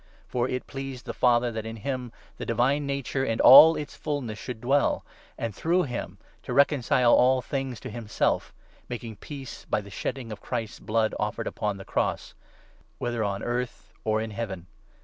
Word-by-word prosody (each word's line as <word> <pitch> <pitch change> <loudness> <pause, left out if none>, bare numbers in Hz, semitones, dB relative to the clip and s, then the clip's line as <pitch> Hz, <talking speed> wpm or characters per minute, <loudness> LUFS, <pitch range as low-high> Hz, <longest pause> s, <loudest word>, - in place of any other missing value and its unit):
For 125 +1 -1
it 125 0 -3
pleased 135 -2 -6
the - - -4
Father 120 -1 +3
that 110 -1 -4
in 110 0 -6
him 125 +1 -4 0.3
the - - -5
divine 135 +5 +1
nature 140 -1 -1
in 115 -4 -1
all 150 +5 +10
its 150 - -5
fulness 135 -8 -3
H|> - - -9
should 120 -4 -6
dwell, 140 +3 +2 0.3
and 115 -2 -3
through 175 - +1
him 125 -5 -5 0.2
to - - -5
reconcile 130 -4 +4
all 130 +1 +6
Reoonciiia 130 - -3
things 135 -4 -3
to 130 - -6
himself 110 -1 -1 0.4
(making 115 -3 -6
peace 140 -3 -8
by - - 0
the 100 -1 -10
shedding 120 +5 -4
tion. - - -7
Of 105 - -7
Christ's 115 -3 -4
blood 110 0 0
offered - - -2
upon 105 -2 -2
the 95 - -9
cross) - - -1 0.3
— - - -32
whether 120 -2 -2
on 100 -1 -2
earth 120 0 -3
or 110 0 +1
in 110 0 -3
Heaven. 100 -5 -5
120 Hz, 190 wpm, -27 LUFS, 110-135 Hz, 0.4 s, all